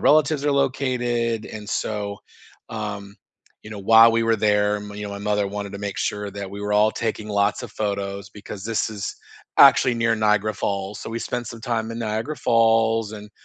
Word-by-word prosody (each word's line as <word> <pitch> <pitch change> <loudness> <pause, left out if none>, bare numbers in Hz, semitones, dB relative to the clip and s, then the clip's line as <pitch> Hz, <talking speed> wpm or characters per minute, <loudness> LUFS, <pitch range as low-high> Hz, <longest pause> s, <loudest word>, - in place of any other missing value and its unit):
relatives 150 -1 +3
are 145 - +2
located, 120 -4 0
and, 105 -1 -8
so, 100 -1 -3 0.5
um, 105 -2 -6 0.5
you 105 - -11
know, 105 - -7
while 115 +3 +7
we 115 0 +2
were 115 0 +3
there, 105 0 +2
m 105 0 -8
you 105 0 -6
know, 100 - -5
my 100 - -6
mother 105 0 0
wanted 100 0 -5
to 100 - -6
make 100 -1 -4
sure 105 -1 -2
that 100 -1 -6
we 100 +1 -7
were 105 0 -2
all 105 +1 +4
taking 110 -1 -3
lots 100 +3 +1
of 120 - -7
photos, 100 -1 -3
because 105 -1 -9
this 110 0 -1
is 100 -3 -5 0.4
actually 125 - +7
near 115 0 +2
Niagara 105 0 +2
Falls, 100 +1 -3
so - - -7
we 115 - -3
spent 120 - -3
some 115 -1 -9
time 115 -2 -2
in 115 - -5
Niagara 110 +7 -2
Falls, 115 -2 +2
and 105 -1 -9
105 Hz, 200 wpm, -23 LUFS, 100-115 Hz, 0.5 s, while